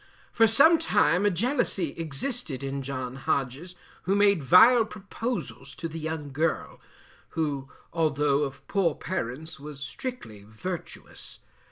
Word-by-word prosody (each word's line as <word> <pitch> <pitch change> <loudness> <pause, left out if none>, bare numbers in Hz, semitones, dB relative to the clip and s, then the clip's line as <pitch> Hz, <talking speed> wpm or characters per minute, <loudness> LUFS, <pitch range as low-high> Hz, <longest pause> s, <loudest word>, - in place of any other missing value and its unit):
For 225 -1 +5
some 315 +9 +6
time 205 - +3
a - - +5
jealousy 200 - 0
existed 160 - -4
in 135 0 -3
John 130 -1 -5
Hodges, 140 +7 -2 0.3
who 195 - +2
made 200 -4 +4
vile 225 - +7
proposals 220 +3 -5
to 165 - -4
the 165 0 -7
young 155 -2 -4
girl, 155 +4 -2 0.6
who 140 -4 -1 0.2
although 150 -3 +2
of 140 -1 -4
poor 185 -6 +1
parents 160 -2 -4
was 145 -1 -9
strictly 140 - -6
virtuous. 160 - -8
160 Hz, 130 wpm, -27 LUFS, 140-205 Hz, 0.6 s, vile